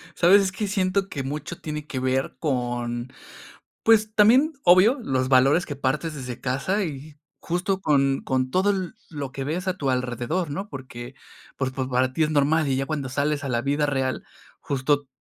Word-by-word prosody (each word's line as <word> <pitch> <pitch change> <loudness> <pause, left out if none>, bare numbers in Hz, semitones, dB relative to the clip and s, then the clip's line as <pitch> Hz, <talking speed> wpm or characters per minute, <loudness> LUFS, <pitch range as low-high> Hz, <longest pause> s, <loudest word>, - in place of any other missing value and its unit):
¿Sabes? 190 +4 +6
Es 190 -1 0
que 205 +2 -3
siento 195 0 0
que 140 - -4
mucho 150 +5 -5
tiene 150 -1 -5
que 130 - -4
ver 130 +1 -1
con, 120 -3 -2 0.7
pues 215 -1 +4
también, 250 +9 +5
obvio, 185 +10 +6
los 130 - 0
valores 135 +6 +4
que 145 - -5
partes 145 +4 -1
desde 125 -4 -7
casa 135 +11 -1
y 150 -1 -7 0.2
justo 180 +3 -1
con 140 -5 +2
con 130 -1 0
todo 190 +7 +2
l 190 -3 -1 0.2
lo 145 -4 -5
que 135 - -4
ves 175 +6 -3
a 185 - -1
tu 140 -6 -1
alrededor, 125 +7 -2
¿no?, 195 +8 -4
porque, 130 -3 -9 0.4
pues, 135 -1 -1
pa 130 -1 -3
para 130 0 +1
ti 160 +3 +2
es 150 - -1
normal, 155 +1 +2
y 135 - +1
ya 135 +1 -1
cuando 150 -4 -3
sales 145 +2 -1
a - - -3
la 120 -1 +1
vida 145 +2 +1
real, 130 -2 -1 0.4
justo 145 +1 0
145 Hz, 190 wpm, -24 LUFS, 130-180 Hz, 0.7 s, Sabes